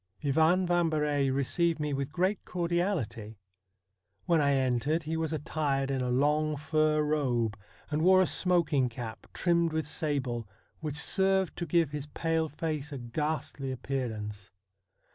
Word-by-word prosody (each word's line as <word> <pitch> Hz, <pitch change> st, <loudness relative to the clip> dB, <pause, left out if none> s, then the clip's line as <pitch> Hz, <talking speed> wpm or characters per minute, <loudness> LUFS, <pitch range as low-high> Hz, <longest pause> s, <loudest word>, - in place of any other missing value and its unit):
Ivan 160 Hz, +6 st, +3 dB
Vambery 155 Hz, -5 st, +1 dB
received 155 Hz, +5 st, +1 dB
me 150 Hz, -1 st, -1 dB
with 140 Hz, 0 st, -2 dB
great 185 Hz, +5 st, 0 dB
cordiality. 170 Hz, -, -2 dB, 0.9 s
When 170 Hz, -3 st, +3 dB
I 140 Hz, -1 st, +3 dB
entered 135 Hz, +5 st, +1 dB
he 160 Hz, +1 st, -3 dB
was 160 Hz, -1 st, -1 dB
attired 145 Hz, -3 st, -1 dB
in 135 Hz, -1 st, -1 dB
a 125 Hz, -, -1 dB
long 150 Hz, +4 st, +2 dB
fur 155 Hz, 0 st, +1 dB
robe, 125 Hz, -8 st, 0 dB, 0.4 s
and 150 Hz, +1 st, 0 dB
wore 185 Hz, +2 st, +6 dB
a -, -, +6 dB
smok 175 Hz, -3 st, +2 dB
ing 130 Hz, -3 st, +3 dB
cap, 115 Hz, -1 st, -7 dB
trimmed 170 Hz, -2 st, +1 dB
with 160 Hz, -1 st, -1 dB
sable, 135 Hz, -7 st, -2 dB, 0.3 s
which 150 Hz, -3 st, -4 dB
served 190 Hz, +4 st, +2 dB
to 170 Hz, -, -3 dB
give 165 Hz, -2 st, +2 dB
his 150 Hz, -1 st, -4 dB
pale 160 Hz, +1 st, -1 dB
face 150 Hz, -1 st, -3 dB
a 140 Hz, -, -4 dB
ghastly 135 Hz, +2 st, -3 dB
appearance. 110 Hz, -6 st, -4 dB
150 Hz, 145 wpm, -30 LUFS, 135-165 Hz, 0.9 s, wore